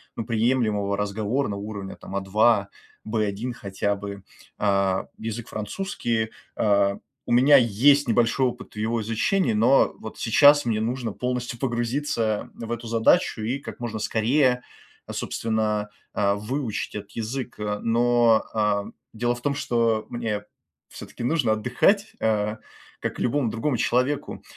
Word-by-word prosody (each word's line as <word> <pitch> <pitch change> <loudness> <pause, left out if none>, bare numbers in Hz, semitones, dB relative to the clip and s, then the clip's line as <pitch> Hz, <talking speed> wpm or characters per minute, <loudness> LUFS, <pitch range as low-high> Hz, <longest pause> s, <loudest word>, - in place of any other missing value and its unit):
ну, 115 - -4
приемлемого 110 -3 +1
разговорного 105 +2 -1
уровня, 100 -2 -6
там, 100 - -9
А2, 100 +2 +3 0.4
В1 110 +2 -1
хотя 100 -1 -2
бы. 100 -1 -7 0.3
А, 100 -2 +1
язык 115 +1 -5
французский. 110 - -2 0.3
А, 100 -2 +2 0.3
у - - -5
меня 135 +4 +7
есть 135 +4 +4
небольшой 120 +3 +3
опыт 125 - -7
в - - -14
его 110 +2 0
изучении, 115 - +1
но 120 +6 +4
вот 110 - -8
сейчас 145 +5 +5
мне 110 -2 0
нужно 120 0 -2
полностью 125 0 -3
погрузиться 120 -3 -1
в 115 0 -7
эту 120 0 -4
задачу 115 -1 +3
и 125 +6 -1
как - - -9
можно 115 -3 -4
скорее, 125 +4 +2 0.5
а, - - -6
собственно, 110 -2 -1 0.2
а, 100 -1 +2
выучить 115 +2 -3
этот 105 -1 -7
язык, 120 +3 -4
а. 105 -1 -2
Но, 120 0 +3
ам, 105 -2 0 0.2
дело 120 +2 0
в 120 - -11
том, 140 +2 0
что 115 -4 +1
мне 110 -3 -3 0.5
всё-таки - - -9
нужно 125 -3 +2
отдыхать, 125 - +1
а, 105 -1 +1 0.4
как - - -4
и - - 0
любому 125 -1 +1
другому 120 +3 -1
человеку. 130 +6 0
115 Hz, 140 wpm, -25 LUFS, 105-125 Hz, 0.5 s, меня